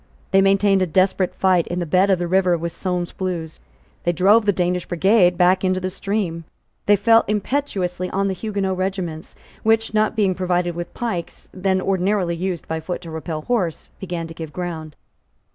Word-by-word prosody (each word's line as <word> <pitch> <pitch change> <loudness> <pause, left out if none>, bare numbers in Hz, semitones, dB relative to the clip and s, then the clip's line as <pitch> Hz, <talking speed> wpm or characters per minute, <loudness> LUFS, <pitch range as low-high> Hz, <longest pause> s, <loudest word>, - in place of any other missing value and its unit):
They 195 -1 +5
maintained 195 0 +3
a 185 - +2
desperate 185 +2 +1
fight 185 -3 +2
in 175 - -3
the 175 - -1
bed 185 +5 +3
of 190 - +4
the 175 0 -2
river 180 -1 +3
with 170 +1 -4
Sulmes's 180 -1 -3
Blues. 170 -4 -4 0.4
They 175 - +2
drove 205 +6 +4
the - - +6
Danish 180 -1 -1
brigade 180 0 +3
back 185 +1 +3
into 185 0 +1
the 185 0 -3
stream. 195 -4 -2 0.4
They 205 - +6
fell 225 +3 +5
impetuously 195 -5 -1
on 195 +1 0
the 195 - 0
Huguenot 195 -1 -2
regiments, 185 -4 -4 0.3
which, 225 0 +2
not 215 +1 +2
being 200 -4 +2
provided 180 -1 0
with 175 +1 -6
pikes, 220 -8 -5
then 190 0 0
ordinarily 190 -1 0
used 180 0 -3
by 160 0 -2
foot 175 +3 -5
to 165 -2 -9
repel 160 -1 -5
horse, 190 -10 -2
began 175 -3 -4
to 165 - -9
give 160 -2 -7
ground. 160 -3 -5
185 Hz, 185 wpm, -21 LUFS, 175-195 Hz, 0.4 s, the